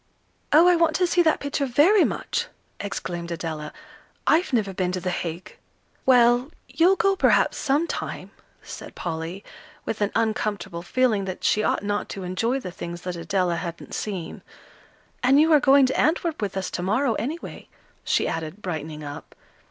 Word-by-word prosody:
"Oh, 325 +4 +7
I 360 - +6
want 330 -2 +2
to 365 - +3
see 350 0 +3
that 320 -2 +3
picture 285 0 -2
very 335 - +5
much!" - - -2 0.3
exclaimed 175 -4 -5
Adela. 160 -3 -5 0.5
"I've 335 +4 +3
never 210 -6 0
been 180 -1 -1
to 185 - -1
The 180 +1 -2
Hague." 170 0 -5 0.5
"Well, 245 +1 +5 0.2
you'll 360 +4 +3
go, 390 +2 +2
perhaps, - - +3
sometime," 295 +5 -2 0.3
said - - -9
Polly, 170 +3 -5 0.4
with 220 - -4
an 205 - +1
uncomfortable 210 -5 -1
feeling 215 +1 +1
that 185 -1 -6
she 215 - +3
ought 210 - 0
not 205 0 -2
to 195 - -6
enjoy 225 +9 -1
the 185 -8 -7
things 170 0 -7
that 180 -1 -4
Adela 175 +1 0
hadn't 170 -1 -6
seen. 190 -6 -5 0.8
"And 265 +3 +5
you 320 +1 +5
are 300 - +7
going 275 0 +6
to 260 - -1
Antwerp 320 -2 +1
with 200 -2 -3
us 190 - -3
to - - -3
morrow, 225 +7 +1
anyway," 310 +8 -6 0.3
she - - +1
added, 160 +4 -4
brightening 155 -3 -5
up. 145 0 -9
210 Hz, 170 wpm, -24 LUFS, 175-285 Hz, 0.8 s, Oh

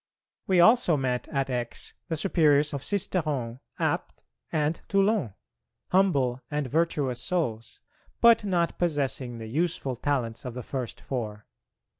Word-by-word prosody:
We 185 -2 +4
also 200 -3 +5
met 125 -2 -1
at 135 -1 -1
Aix 120 -1 -3
the 165 -3 -2
Superiors 150 -4 +3
of 140 - -3
Sisteron, 150 - -1 0.2
Apt, - - -2 0.3
and 155 +1 0
Toulon, 195 - +1 0.5
humble 140 -10 +2
and 150 -1 -1
virtuous 145 -3 0
souls, 120 - -2 0.4
but 235 -2 +6
not 175 -4 0
possessing 135 -7 -1
the 115 - -7
useful 140 +1 -1
talents 120 -3 -2
of 125 -2 -6
the 125 - -5
first 130 -2 -5
four. 105 -5 -4
145 Hz, 130 wpm, -27 LUFS, 125-175 Hz, 0.5 s, but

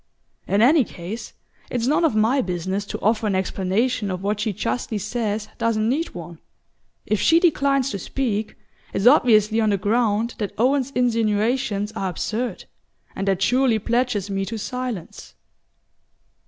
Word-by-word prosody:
In 200 +2 +3
any 290 +3 +6
case, 200 +2 -8 0.4
it's 240 -2 -1
none 300 +6 +2
of 315 -9 +2
my 225 +6 +3
business 190 +2 -3
to - - -5
offer 220 +1 +1
an 200 - 0
explanation 195 +4 0
of 185 0 -4
what 205 +1 -1
she 215 +1 0
justly 220 +3 -2
says 210 0 -2
doesn't 225 -2 +1
need 290 - -1
one. 170 -1 -8 0.7
If 215 - 0
she 330 - +5
declines 275 -6 +2
to 200 - -4
speak, 220 -2 -2 0.4
it's 195 - -1
obviously 225 -4 +5
on 215 - +2
the 200 - +2
ground 220 +2 +1
that 205 -2 -3
Owen's 260 +3 +2
insinuations 225 -2 +1
are 195 -4 -3
absurd; 220 +7 -3 0.5
and 195 - -3
that 195 -1 +1
surely 250 -1 +3
pledges 235 -2 0
me 195 0 -1
to 225 +4 -5
silence." 245 -4 -6
220 Hz, 155 wpm, -22 LUFS, 200-245 Hz, 0.7 s, any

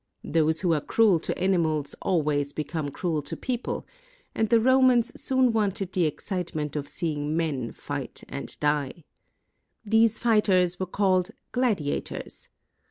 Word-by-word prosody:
Those 160 0 +1
who 175 -3 +2
are 150 - +1
cruel 205 -1 +3
to - - -3
animals 160 -6 +1
always 145 -5 0
become 155 -1 -3
cruel 160 +1 -2
to 145 - -6
people; 250 -2 -3 0.5
and 220 -1 0
the 230 - +5
Romans 255 0 +4
soon 260 -2 +2
wanted 200 -3 0
the 175 -4 +2
ex 150 - -7
citement 170 -6 -3
of 145 -1 -3
seeing 150 -2 -2
men 140 -8 -1
fight - - -6
and - - -6
die. 150 +1 -1 0.8
These 225 +1 +3
fighters 190 -6 +2
were 185 - -2
called 185 0 +1 0.2
gladiators. 215 - -2
180 Hz, 140 wpm, -26 LUFS, 150-220 Hz, 0.8 s, the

